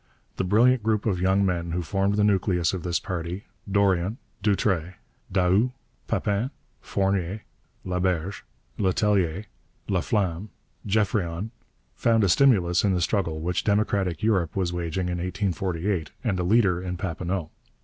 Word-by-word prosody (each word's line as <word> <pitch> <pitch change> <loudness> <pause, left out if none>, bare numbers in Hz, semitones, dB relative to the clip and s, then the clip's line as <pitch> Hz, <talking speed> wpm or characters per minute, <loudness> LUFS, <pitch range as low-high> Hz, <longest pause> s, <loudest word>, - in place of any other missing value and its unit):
The - - 0
brilliant 115 +6 +4
group 110 -1 0
of 95 -5 0
young 95 +2 +3
men 85 -2 -1
who 90 0 -1
formed 100 +3 0
the 105 - +2
nucleus 95 -4 +2
of 95 - -3
this 85 0 0
party, 90 +2 -4 0.3
Dorion, 100 +1 +2 0.2
Doutre, 95 -4 +1 0.4
Daoust, 95 +6 +3 0.3
Papin, 105 +5 0 0.3
Fournier, 95 +1 -1 0.4
Laberge, 90 0 -1 0.4
Letellier, 95 -2 +1 0.4
Laflamme, 95 0 0 0.4
Geoffrion, 100 -2 0 0.4
found 115 -2 +2
a 100 - +3
stimulus 90 -7 +4
in 100 -2 +2
the - - +1
struggle 85 -4 0
which 90 +2 -1
democratic 100 -5 +1
Europe 95 -8 +1
was 90 -3 0
waging 90 +1 -2
in 90 0 -2
1848, 90 -2 -1
and 100 -7 0
a - - 0
leader 95 -2 +3
in 90 -1 -4
Papineau. 90 -2 -3
95 Hz, 135 wpm, -25 LUFS, 90-105 Hz, 0.4 s, brilliant